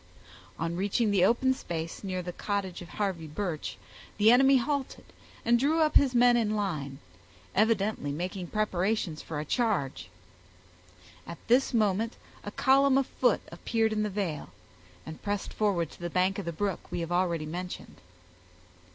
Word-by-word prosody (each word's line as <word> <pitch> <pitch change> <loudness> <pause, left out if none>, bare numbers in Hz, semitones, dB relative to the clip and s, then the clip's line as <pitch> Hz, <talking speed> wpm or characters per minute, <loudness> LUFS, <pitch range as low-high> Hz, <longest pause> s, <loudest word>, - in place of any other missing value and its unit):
On 165 +1 -2
reaching 205 +4 +1
the 195 -3 +3
open 250 +6 +3
space 165 -10 -5
near 185 -2 -3
the 180 0 -5
cottage 200 -3 -3
of 175 - -10
Harvey 190 -6 -2
Birch, 160 0 -4 0.4
the 215 +2 +6
enemy 265 +2 +6
halted 275 +1 -2 0.4
and 235 +1 +4
drew 310 +5 +2
up 305 -1 +2
his 265 -3 +5
men 245 0 +6
in 215 -3 +1
line, 155 -10 -3 0.6
evidently 215 -7 +1
making 180 +4 -4
preparations 195 -4 -1
for 155 -2 -5
a 150 - -4
charge. 205 - -1 1.2
At 170 - -7
this 250 +3 +4
moment 220 -1 +1 0.3
a - - -5
column 270 0 +4
of 275 - +2
foot 245 -3 +1
appeared 220 +5 0
in 215 - 0
the 210 - 0
vale, 185 -7 -3 0.6
and 160 - -9
pressed 205 -1 -3
forward 185 -7 0
to - - -15
the 175 0 -4
bank 185 +3 +1
of 200 - -5
the 170 - -2
brook 195 +2 -2
we 175 - -2
have 165 +1 -4
already 175 -3 +1
mentioned. 180 +3 -6
200 Hz, 160 wpm, -29 LUFS, 175-230 Hz, 1.2 s, the